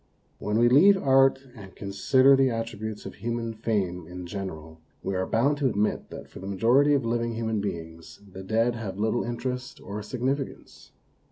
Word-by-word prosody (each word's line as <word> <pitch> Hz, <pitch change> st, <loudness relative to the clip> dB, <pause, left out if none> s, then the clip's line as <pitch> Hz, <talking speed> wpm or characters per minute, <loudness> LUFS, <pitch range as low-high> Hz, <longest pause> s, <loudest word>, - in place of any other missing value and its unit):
When 105 Hz, +1 st, -1 dB
we 120 Hz, +1 st, +5 dB
leave 185 Hz, +11 st, +6 dB
art 135 Hz, -3 st, +4 dB
and 100 Hz, -4 st, -12 dB
consider 130 Hz, +7 st, +4 dB
the 135 Hz, 0 st, +4 dB
attri 115 Hz, -3 st, -3 dB
butes 110 Hz, -1 st, -6 dB
of -, -, -7 dB
human 115 Hz, -1 st, -3 dB
fame 95 Hz, -6 st, -2 dB
in 90 Hz, +1 st, -8 dB
general, 80 Hz, -4 st, -7 dB, 0.2 s
we 95 Hz, -, -2 dB
are 95 Hz, 0 st, -1 dB
bound 140 Hz, +6 st, +2 dB
to 135 Hz, -3 st, +2 dB
admit 105 Hz, -1 st, -1 dB
that -, -, -9 dB
for -, -, -12 dB
the 95 Hz, -, -8 dB
majority 120 Hz, +9 st, +3 dB
of 135 Hz, -4 st, 0 dB
living 115 Hz, 0 st, -1 dB
human 110 Hz, -2 st, -1 dB
beings 85 Hz, -4 st, -7 dB
the 95 Hz, 0 st, -10 dB
dead 115 Hz, +5 st, +1 dB
have 105 Hz, -5 st, -6 dB
little 110 Hz, +3 st, 0 dB
interest 125 Hz, +2 st, -4 dB
or 105 Hz, +1 st, -6 dB
significance. 130 Hz, +5 st, -4 dB
115 Hz, 180 wpm, -26 LUFS, 100-125 Hz, 0.2 s, leave